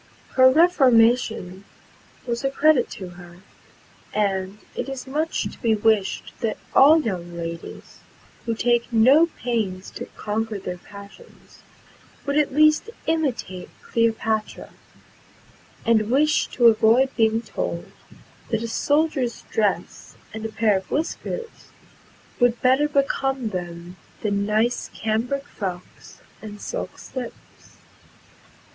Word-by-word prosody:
Her 260 Hz, 0 st, +6 dB
reformation 245 Hz, -, +3 dB, 0.6 s
was 235 Hz, +1 st, -3 dB
a 270 Hz, -, +2 dB
credit 285 Hz, -1 st, +3 dB
to 185 Hz, -2 st, -8 dB
her; 175 Hz, 0 st, -13 dB, 0.8 s
and 195 Hz, -1 st, -1 dB, 0.2 s
it 245 Hz, -, -4 dB
is 270 Hz, -1 st, -6 dB
much 305 Hz, +4 st, -1 dB
to -, -, -7 dB
be 225 Hz, -3 st, +3 dB
wished 210 Hz, -2 st, 0 dB
that 225 Hz, -2 st, -2 dB, 0.2 s
all 300 Hz, +4 st, +7 dB
young 175 Hz, -, -4 dB
ladies, 170 Hz, 0 st, -7 dB, 0.5 s
who 230 Hz, -, 0 dB
take 240 Hz, +1 st, +1 dB
no 260 Hz, +9 st, +6 dB
pains 220 Hz, -, -3 dB
to -, -, -7 dB
conquer 220 Hz, 0 st, -2 dB
their 180 Hz, -2 st, -6 dB
passions, 200 Hz, -, -15 dB, 0.6 s
would 280 Hz, 0 st, -1 dB
at 300 Hz, -1 st, +2 dB
last 305 Hz, +8 st, +4 dB, 0.2 s
imitate 270 Hz, -, -2 dB
Cleopatra, 225 Hz, -1 st, -1 dB, 1.1 s
and 220 Hz, -2 st, +3 dB
wish 300 Hz, +5 st, +3 dB
to 240 Hz, -, 0 dB
avoid 230 Hz, +4 st, +5 dB
being 225 Hz, 0 st, +2 dB
told, -, -, -4 dB, 0.6 s
that 225 Hz, 0 st, -1 dB
a -, -, -2 dB
soldier's 285 Hz, -1 st, 0 dB
dress 210 Hz, -2 st, -2 dB, 0.2 s
and 220 Hz, -, -6 dB
a -, -, -10 dB
pair 215 Hz, -2 st, +2 dB
of 190 Hz, -, -8 dB
whiskers 405 Hz, +9 st, -4 dB, 0.7 s
would 245 Hz, -1 st, +3 dB
better 265 Hz, +4 st, +4 dB
become 270 Hz, -3 st, 0 dB
them 175 Hz, -1 st, -7 dB, 0.3 s
than 200 Hz, -1 st, 0 dB
nice 220 Hz, +3 st, 0 dB
cambric 235 Hz, +6 st, -1 dB
frocks 180 Hz, -7 st, -8 dB, 0.2 s
and 210 Hz, -1 st, -9 dB
silk -, -, -5 dB
slips. 250 Hz, -3 st, -10 dB
230 Hz, 120 wpm, -23 LUFS, 205-270 Hz, 1.1 s, all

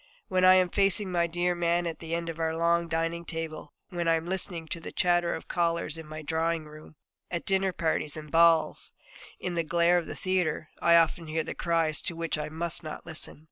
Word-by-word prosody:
When 185 Hz, 0 st, +2 dB
I 185 Hz, 0 st, +8 dB
am 185 Hz, -1 st, +4 dB
facing 195 Hz, -1 st, +3 dB
my 170 Hz, -1 st, +2 dB
dear 175 Hz, +1 st, 0 dB
man 175 Hz, 0 st, +1 dB
at 165 Hz, -1 st, -4 dB
the 165 Hz, -, -9 dB
other -, -, +2 dB
end 170 Hz, 0 st, -4 dB
of 165 Hz, 0 st, -6 dB
our 160 Hz, 0 st, -1 dB
long 170 Hz, 0 st, +2 dB
dining 165 Hz, +1 st, -1 dB
table, 160 Hz, -3 st, -5 dB, 0.2 s
when 175 Hz, -3 st, -2 dB
I 165 Hz, -, +5 dB
am 160 Hz, 0 st, -3 dB
listening 175 Hz, -2 st, -3 dB
to 170 Hz, -, -3 dB
the 160 Hz, -, -8 dB
chatter 175 Hz, -1 st, +2 dB
of -, -, -9 dB
callers 170 Hz, -2 st, 0 dB
in 160 Hz, -1 st, -9 dB
my 155 Hz, 0 st, -7 dB
drawing 160 Hz, +1 st, -1 dB
room, 155 Hz, +1 st, -13 dB, 0.3 s
at 170 Hz, -1 st, -3 dB
dinner 190 Hz, 0 st, +2 dB
parties 160 Hz, -3 st, -1 dB
and 150 Hz, -1 st, -9 dB
balls, 165 Hz, -1 st, +3 dB, 0.5 s
in 180 Hz, -, -3 dB
the 170 Hz, -1 st, 0 dB
glare 170 Hz, +2 st, +3 dB
of 170 Hz, -, -7 dB
the -, -, -5 dB
theatre, 185 Hz, -4 st, -1 dB
I 170 Hz, -, +5 dB
often 165 Hz, 0 st, +3 dB
hear 160 Hz, +1 st, -1 dB
the -, -, -5 dB
cries 165 Hz, -2 st, 0 dB
to 175 Hz, -, -3 dB
which 165 Hz, -1 st, -2 dB
I 150 Hz, 0 st, -4 dB
must 165 Hz, +2 st, -2 dB
not 155 Hz, -2 st, -8 dB
listen. 160 Hz, -2 st, -3 dB
170 Hz, 225 wpm, -28 LUFS, 160-175 Hz, 0.5 s, I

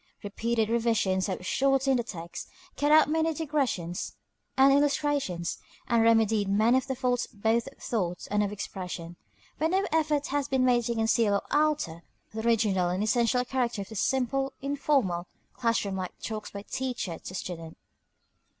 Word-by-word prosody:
Repeated 225 Hz, +2 st, -1 dB
revisions 225 Hz, -5 st, +1 dB
have 185 Hz, -2 st, -4 dB
shortened 270 Hz, +1 st, +2 dB
the -, -, 0 dB
text, 170 Hz, -6 st, -7 dB, 0.3 s
cut 290 Hz, +1 st, +1 dB
out 310 Hz, 0 st, +7 dB
many 320 Hz, +1 st, +1 dB
digressions 270 Hz, -, -2 dB, 0.4 s
and 270 Hz, +1 st, +7 dB
illustrations, 285 Hz, -, 0 dB, 0.3 s
and 235 Hz, -1 st, +3 dB
remedied 225 Hz, -3 st, +3 dB
many 215 Hz, +5 st, +4 dB
of 260 Hz, -, -10 dB
the 265 Hz, -, -2 dB
faults 250 Hz, -1 st, 0 dB
both 225 Hz, +3 st, 0 dB
of 275 Hz, -, -11 dB
thought 180 Hz, -6 st, -3 dB
and 210 Hz, 0 st, +2 dB
of 205 Hz, -, -2 dB
expression; 180 Hz, -4 st, -6 dB, 0.4 s
but 315 Hz, +2 st, +2 dB
no 380 Hz, +3 st, +1 dB
effort 300 Hz, -2 st, +1 dB
has 285 Hz, 0 st, 0 dB
been 265 Hz, -2 st, +2 dB
made 240 Hz, -2 st, +3 dB
to 235 Hz, 0 st, -1 dB
conceal 225 Hz, -2 st, +2 dB
or 200 Hz, -, +1 dB
alter 295 Hz, -, +1 dB, 0.3 s
the 220 Hz, -, -3 dB
original 210 Hz, -6 st, +2 dB
and 185 Hz, +3 st, -1 dB
essential 240 Hz, +2 st, +2 dB
character 245 Hz, -5 st, -1 dB
of 195 Hz, -, -15 dB
the 220 Hz, -, -9 dB
simple, 270 Hz, +4 st, 0 dB
informal, 270 Hz, -11 st, 0 dB, 0.3 s
class 230 Hz, -4 st, 0 dB
room 190 Hz, -1 st, -2 dB, 0.2 s
talks 215 Hz, -1 st, -5 dB
by 200 Hz, 0 st, -8 dB
teacher 245 Hz, -10 st, -4 dB
to 185 Hz, -, -8 dB
student. 165 Hz, -3 st, -6 dB
230 Hz, 160 wpm, -28 LUFS, 200-270 Hz, 0.4 s, out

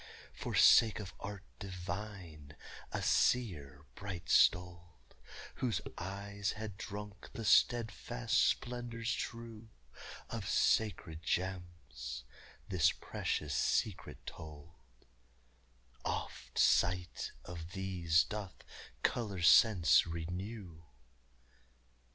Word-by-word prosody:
For -, -, -4 dB
sake 110 Hz, -2 st, +7 dB
of 100 Hz, -3 st, -7 dB
art 100 Hz, -1 st, -6 dB, 0.2 s
divine 95 Hz, -5 st, -7 dB, 0.4 s
a -, -, -2 dB
seer 75 Hz, -, +1 dB
bright 95 Hz, -4 st, -7 dB
stoled, 85 Hz, -7 st, +2 dB, 0.4 s
Whose 120 Hz, -7 st, 0 dB, 0.2 s
eyes 100 Hz, +2 st, -4 dB
had 105 Hz, -2 st, -6 dB
drunk 105 Hz, +2 st, -8 dB
the 115 Hz, -, -5 dB
steadfast 110 Hz, -, +2 dB
splendors 120 Hz, -1 st, +1 dB
true 115 Hz, -2 st, -6 dB, 0.6 s
Of -, -, -4 dB
sacred 90 Hz, -7 st, +1 dB
gems, 85 Hz, -11 st, -4 dB, 0.4 s
this 90 Hz, -5 st, +3 dB
precious 75 Hz, -2 st, -3 dB
secret 105 Hz, +5 st, 0 dB
told: 75 Hz, +1 st, -10 dB, 1.3 s
"Oft -, -, -4 dB
sight 90 Hz, 0 st, +2 dB
of 85 Hz, 0 st, -8 dB
these 90 Hz, -4 st, +2 dB
doth 105 Hz, -3 st, -7 dB, 0.4 s
color 100 Hz, -7 st, -1 dB
sense 90 Hz, -2 st, +6 dB
renew!" 90 Hz, +2 st, -6 dB
95 Hz, 85 wpm, -34 LUFS, 85-105 Hz, 1.3 s, sake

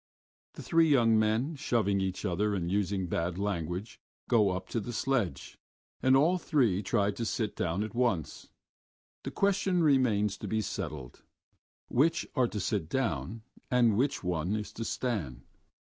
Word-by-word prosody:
The -, -, -9 dB
three 165 Hz, -1 st, +3 dB
young 115 Hz, -6 st, +4 dB
men, 110 Hz, +8 st, +1 dB
shoving 105 Hz, -7 st, 0 dB
each 95 Hz, +1 st, -3 dB
other 100 Hz, +3 st, 0 dB
and 85 Hz, -2 st, -2 dB
using 100 Hz, -1 st, 0 dB
bad 85 Hz, 0 st, -2 dB
language, 95 Hz, 0 st, -3 dB, 0.3 s
go 110 Hz, -4 st, +4 dB
up 95 Hz, 0 st, -3 dB
to 115 Hz, -, -1 dB
the 120 Hz, +3 st, -6 dB
sledge, 115 Hz, -, -2 dB, 0.4 s
and 130 Hz, +1 st, +5 dB
all 170 Hz, +6 st, +3 dB
three 120 Hz, -, +1 dB
try 105 Hz, 0 st, +1 dB
to 115 Hz, -, -5 dB
sit 110 Hz, -1 st, -2 dB
down 90 Hz, +3 st, -1 dB
at 110 Hz, -, -6 dB
once. 115 Hz, -, -1 dB, 0.7 s
The -, -, -5 dB
question 190 Hz, -3 st, +1 dB
remains 115 Hz, -9 st, +2 dB
to -, -, -7 dB
be 110 Hz, 0 st, 0 dB
settled: 75 Hz, -, -6 dB, 0.7 s
Which 160 Hz, +7 st, +2 dB
are 130 Hz, -3 st, +2 dB
to 105 Hz, -, -5 dB
sit 100 Hz, -5 st, -2 dB
down 110 Hz, -, -2 dB, 0.3 s
and 120 Hz, -4 st, +3 dB
which 130 Hz, +1 st, 0 dB
one 90 Hz, +2 st, -1 dB
is 105 Hz, -1 st, -5 dB
to 115 Hz, -, -5 dB
stand? 85 Hz, -, -3 dB
105 Hz, 160 wpm, -30 LUFS, 95-125 Hz, 0.7 s, and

